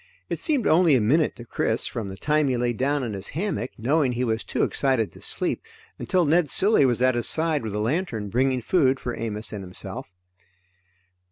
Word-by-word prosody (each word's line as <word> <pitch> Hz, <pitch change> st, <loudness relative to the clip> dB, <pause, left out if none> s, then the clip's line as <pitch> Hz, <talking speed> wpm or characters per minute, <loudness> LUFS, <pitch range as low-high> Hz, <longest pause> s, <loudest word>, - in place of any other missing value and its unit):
It -, -, -2 dB
seemed 285 Hz, -8 st, 0 dB
only 165 Hz, -2 st, +4 dB
a -, -, +4 dB
minute 145 Hz, +9 st, +2 dB
to 120 Hz, -, -11 dB
Chris -, -, -1 dB
from 110 Hz, -4 st, -4 dB
the 95 Hz, 0 st, -8 dB
time 150 Hz, +6 st, +1 dB
he 130 Hz, -2 st, 0 dB
lay 120 Hz, 0 st, 0 dB
down 140 Hz, +4 st, 0 dB
in 115 Hz, -4 st, -4 dB
his 100 Hz, 0 st, -4 dB
hammock, 170 Hz, -, -2 dB
knowing 135 Hz, +3 st, +1 dB
he 120 Hz, +1 st, -2 dB
was 110 Hz, -2 st, -1 dB
too -, -, -1 dB
excited 130 Hz, -6 st, 0 dB
to -, -, -16 dB
sleep, -, -, -2 dB, 0.4 s
until 180 Hz, -2 st, +1 dB
Ned 160 Hz, 0 st, +2 dB
Cilley 190 Hz, -7 st, +4 dB
was 125 Hz, 0 st, +1 dB
at 130 Hz, 0 st, +4 dB
his 120 Hz, -1 st, +3 dB
side 160 Hz, -2 st, +2 dB
with 110 Hz, -3 st, -5 dB
a -, -, -1 dB
lantern, 115 Hz, -, -2 dB
bringing 130 Hz, +3 st, +1 dB
food 135 Hz, -1 st, +2 dB
for 120 Hz, -, -4 dB
Amos 110 Hz, -1 st, -4 dB
and 100 Hz, -2 st, -5 dB
himself. 95 Hz, +1 st, -7 dB
130 Hz, 205 wpm, -24 LUFS, 110-155 Hz, 0.4 s, only